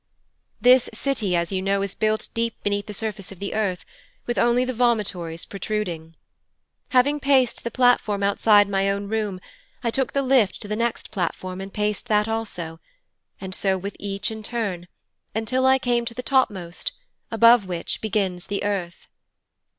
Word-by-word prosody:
'This 250 0 +6
city, 220 -8 0
as 170 +1 0
you 190 -1 -1
know, 195 +1 +1
is 200 - -3
built 215 0 0
deep 230 0 -1
beneath 205 0 -1
the - - -5
surface 205 -2 -5
of 195 - -10
the 200 +2 -4
earth, 200 -5 -1 0.4
with 240 - -1
only 240 +1 +3
the 255 - -2
vomitories 205 -9 0
protruding. 180 -6 -4 0.7
Having 280 +3 +3
paced 270 -4 +2
the 235 - -2
platform 245 -5 +2
outside 205 +1 +5
my 195 0 +1
own 200 0 -2
room, 210 -3 -2 0.4
I 235 - +1
took 265 +2 -1
the 275 - +1
lift 255 -7 +3
to - - -7
the 210 - -2
next 235 +1 -2
platform 185 -1 -3
and 195 0 -7
paced 210 +3 -2
that 210 -2 +2
also, 180 -8 -4 0.6
and 190 -1 -6
so 190 0 +1
with 200 +2 -6
each 200 +1 -3
in 220 0 -6
turn, 205 -6 -3 0.5
until 255 +4 +1
I 265 0 +6
came 240 -2 0
to 230 - -6
the 250 - -5
topmost, 200 -10 0 0.4
above 230 -2 +6
which 175 -2 -3
begins 195 -5 -1
the 200 0 -2
earth. 195 -4 -3
210 Hz, 170 wpm, -24 LUFS, 195-235 Hz, 0.7 s, This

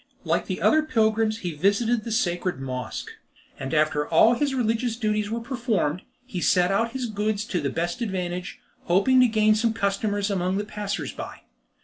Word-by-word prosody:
Like - - 0
the - - -3
other 310 - +5
pilgrims 220 -6 +1
he 175 - -2
visited 210 +8 +1
the 230 - -5
sacred 180 - 0
Mosque, 130 -2 -5 0.5
and 135 0 -4
after 150 -1 +1
all 215 +8 +6
his 275 +2 0
religious 230 -1 0
duties 215 -2 -1
were 230 +2 -2
performed, 230 - -1 0.2
he 195 -9 -5
set 180 +1 +3
out 230 +4 +1
his 260 -2 -2
goods 210 -1 -1
to 180 -6 -2
the 140 - -1
best 170 - -3
advantage, 180 -4 -3 0.3
hoping 200 +9 +4
to 250 - +6
gain 215 -1 +3
some 220 +1 +1
customers 205 0 -1
among 185 0 0
the 205 - -2
passers 210 -1 -4
by. - - -8
210 Hz, 175 wpm, -25 LUFS, 180-230 Hz, 0.5 s, all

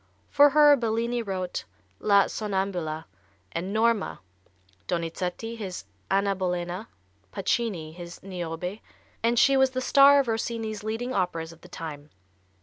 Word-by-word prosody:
For 290 0 +7
her 295 0 +7
Bellini 235 0 -1
wrote 185 -4 -4 0.3
"La 200 -1 +5
Sonnambula" 190 -6 -2 0.5
and 180 +4 -3
"Norma," 225 -1 +1 0.7
Donizetti 180 +6 -3
his 190 - -6 0.2
"Anna 195 0 +2
Bolena," 180 +2 -3 0.4
Pacini 195 -5 -1
his 175 0 -9
"Niobe," 180 +1 -5 0.4
and 235 +1 +2
she 275 +2 +5
was 265 0 +5
the 255 0 -3
star 280 +2 +6
of 275 - +1
Rossini's 225 -2 -2
leading 225 +4 -3
operas 165 -4 -1
of 165 - -16
the - - -13
time. 150 -3 -7
200 Hz, 130 wpm, -27 LUFS, 175-235 Hz, 0.7 s, For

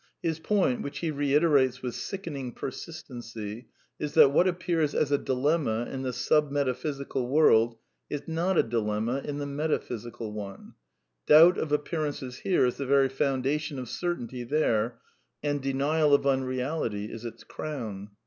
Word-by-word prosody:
His 160 -2 -1
point, 180 -8 +1
which 140 +1 -5
he 165 -2 -1
reiterates 140 -3 +2
with 125 -2 -3
sickening 140 -10 -5
persistency, 120 -6 -7 0.3
is 150 -1 -4
that 135 - +8
what 175 +6 +4
appears 175 -4 0
as 145 - +1
a 145 - +4
dilemma 130 -3 0
in 135 - -4
the 130 -1 -2
sub 150 +4 +2
metaphysical 140 -1 -2
world 120 -5 +4 0.3
is 145 - -5
not 170 +3 0
a - - +6
dilemma 115 +2 -1
in 145 -1 -4
the 145 - -3
metaphysical 120 -6 -3
one; 100 -2 -8 0.5
doubt 165 +4 +8
of 155 - -3
appear 150 +2 0
ances 130 -3 -6
here 180 -8 +2
is 125 - -1
the 140 - -3
very 135 0 +4
foundation 140 +2 -1
of 125 -1 -5
certainty 130 -6 -3
there, 120 -4 0 0.4
and 145 -1 0
denial 145 +3 +3
of 140 - 0
unreality 130 -4 -1
is 115 - -8
its 115 -1 -8
crown. 110 -10 -6
135 Hz, 155 wpm, -28 LUFS, 120-150 Hz, 0.5 s, that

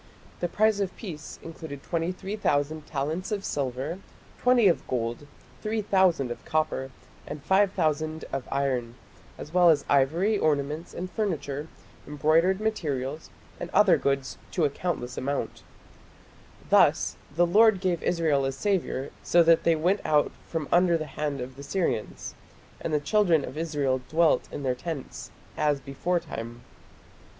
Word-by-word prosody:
The 175 - 0
price 215 +3 +2
of 195 -2 -2
peace 160 -8 -8
included 160 -4 -8
23,000 165 -4 -1
talents 155 +8 -3
of 200 -2 -2
silver, 140 +5 -3 0.4
20 250 -4 +5
of 175 - +1
gold, 120 +3 -3 0.3
3000 190 - +2
of - - -7
copper, 155 -4 -1 0.4
and 150 - -7
5000 160 -5 +1
of 135 -2 -3
iron, 130 -4 -1 0.4
as 150 - -9
well 180 -1 +6
as 145 -3 +3
ivory 165 +10 +2
ornaments 150 +1 -1
and 180 +1 -5
furniture, 155 -8 -2 0.4
embroidered 160 +6 +2
materials, 155 -9 -2 0.3
and 175 - -5
other 195 -5 +6
goods 135 -1 -1
"to 170 - +2
a 145 - +1
countless 140 -7 -3
amount". 140 +2 -3 1.1
Thus - - +4 0.2
"the 175 +1 +4
Lord 210 +3 +5
gave 180 -3 0
Israel 160 -5 +1
a 135 - 0
saviour, 160 -3 -1
so 175 0 +4
that 165 0 +5
they 165 - +5
went 180 +6 +1
out 150 -1 +2 0.2
from 160 -3 -3
under 175 -1 +4
the 155 - -4
hand 145 -2 -2
of 130 +1 -7
the - - -8
Syrians: 165 - -2 0.5
and - - -4
the 150 - +2
children 170 -2 +2
of - - -8
Israel 145 -5 -1
dwelt 165 0 +3
in 145 - -5
their 130 -2 +1
tents, 140 +2 -6 0.3
as 150 -2 +1
beforetime". 135 -4 -3
155 Hz, 140 wpm, -27 LUFS, 140-180 Hz, 1.1 s, well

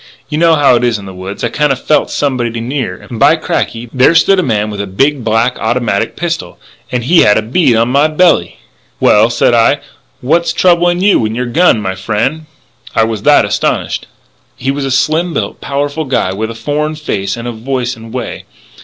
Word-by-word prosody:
You 150 0 -2
know 165 -1 +4
how 145 -4 +4
it 120 - -2
is 120 -3 +1
in 100 - -10
the 95 - -9
woods.... 95 +2 -7
I 120 - 0
kinda 145 +3 +1
felt 150 +4 0
somebody 120 -5 -2
near. 130 +3 -4
And, 115 - -7
by 145 +5 +5
cracky! 120 -6 -3
there 130 +5 +4
stood 195 +3 +4
a - - +3
man 110 - -1
with 100 -1 -4
a 100 - -5
big, 135 +8 0
black 115 +3 +1
automatic 110 -3 -1
pistol, 170 -1 -4 0.3
and 125 -1 -2
he 165 +8 +4
had 105 - +5
a 110 - 0
bead 130 +2 +2
on 115 +2 +2
my 140 +4 +3
belly. 155 - +2 0.4
"'Well,' 105 +2 +4
said 120 - +2
I, 115 -1 +3 0.4
'what's 165 +6 +1
troubling 175 0 +2
you 200 - +3
and 110 +1 -3
your 125 +1 -2
gun, 135 0 +3
my 95 -1 -2
friend?' 115 +11 -2 0.5
I 115 - +4
was 110 -2 -2
that - - +4
astonished. - - -2 0.5
"He 130 +1 -2
was 140 0 -3
a - - -2
slim 155 +6 0
built, - - -3
powerful 145 +2 -2
guy 125 -8 -1
with 110 +3 -3
a 115 - -7
foreign 150 +5 -2
face 100 -9 -3
and 115 +1 -6 0.2
voice 130 -1 -2
and 115 -1 -12
way. 125 -1 -6
125 Hz, 205 wpm, -13 LUFS, 115-150 Hz, 0.5 s, by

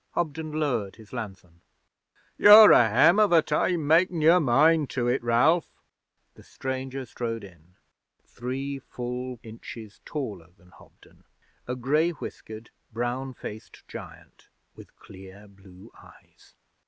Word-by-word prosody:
Hobden 160 -1 -3
lowered 130 -10 -2
his 110 0 -17
lanthorn. 95 -7 -9 0.7
'You're 210 +1 +9
a 115 -2 +5
hem 155 - +4
of 210 -3 +3
a 165 -2 +5
time 155 +1 -1
makin' 170 +3 +2
your 165 +4 +5
mind 150 +2 +3
to 120 -2 -2
it, 125 +2 0
Ralph!' 120 +9 +1 0.5
The - - -18
stranger 130 0 -6
strode 115 -1 -5
in 90 -2 -17 0.5
three 135 +3 -6
full 125 -1 -7
inches 110 -1 -11
taller 105 - -6
than 90 +1 -23
Hobden, - - -22 0.4
a 125 - -3
grey 150 +7 +1
whiskered, 110 -8 -10 0.2
brown 120 +3 -4
faced 110 0 -11
giant - - -13 0.3
with - - -16
clear 95 +2 -15
blue 95 -2 -17
eyes. - - -21
125 Hz, 130 wpm, -25 LUFS, 110-155 Hz, 0.7 s, You're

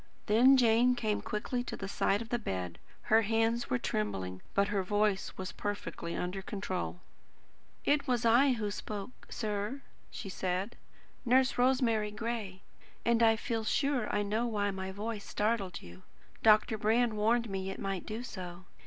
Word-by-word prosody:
Then 245 +5 +6
Jane 240 +1 +4
came 215 -3 -1
quickly 245 +4 -2
to - - -5
the 195 - -5
side 200 +2 +1
of 225 - -14
the 240 - 0
bed. 90 - -4 0.2
Her 220 +1 +5
hands 225 +2 +1
were 125 - +2
trembling, 95 -5 -3
but 200 +1 +3
her 205 -2 +1
voice 205 +1 0
was 185 -1 -4
perfectly 205 -4 -4
under 180 +2 -3
control. 190 -3 -4 0.8
"It 290 0 +2
was 245 -2 +1
I 250 +4 +5
who 210 -4 -2
spoke, 205 +3 -7
sir," 215 +5 -3 0.3
she - - -7
said; 190 +3 -2 0.5
"Nurse 255 +1 +3
Rosemary 245 -4 +2
Gray. 215 -3 -4 0.4
And 235 0 +3
I 225 -1 +6
feel 225 0 -2
sure 265 0 +1
I 205 - +1
know 215 +4 0
why 205 -3 0
my 190 0 -4
voice 210 +1 -4
startled 205 -4 -1
you. 90 +1 -12 0.4
Dr. 215 0 +5
Brand 225 +2 +2
warned 230 +3 +2
me 195 -1 -3
it 195 - -5
might 195 -2 -3
do 220 +3 -4
so. 185 -6 -7
215 Hz, 160 wpm, -32 LUFS, 195-235 Hz, 0.8 s, Then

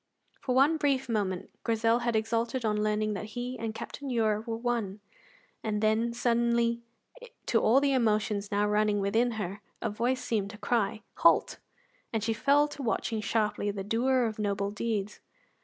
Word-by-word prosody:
For 255 - -1
one 285 +5 +5
brief 280 -4 +1
moment 200 -5 -2
Grizel 230 0 +2
had 235 -1 -1
exulted 230 +2 0
on 210 -1 +1
learning 215 0 0
that 205 +1 -4
he 250 +1 -3
and 225 -1 -4
Captain 280 +4 -6
Ure 220 -3 +1
were 225 -1 -2
one, 230 -4 -2 0.6
and 215 -1 -1
then 220 +2 +2
suddenly, 235 0 +1 0.6
to 225 - +2
all 240 +5 +5
the 280 -1 +2
emotions 215 -4 +1
now 205 +1 +2
running 210 0 +2
within 225 +5 +1
her, 205 -2 -4 0.2
a - - -2
voice 245 +4 -1
seemed 215 -5 -1
to 210 - -10
cry, 215 0 0
"Halt!" - - +4 0.5
and 225 -3 -1
she 225 0 +1
fell 285 +5 +3
to 290 - -8
watching 225 -2 -1
sharply 210 -1 0
the 200 -1 -3
doer 245 +4 +2
of 220 -1 -3
noble 200 -1 -1
deeds. 210 -2 -3
225 Hz, 170 wpm, -29 LUFS, 210-240 Hz, 0.6 s, one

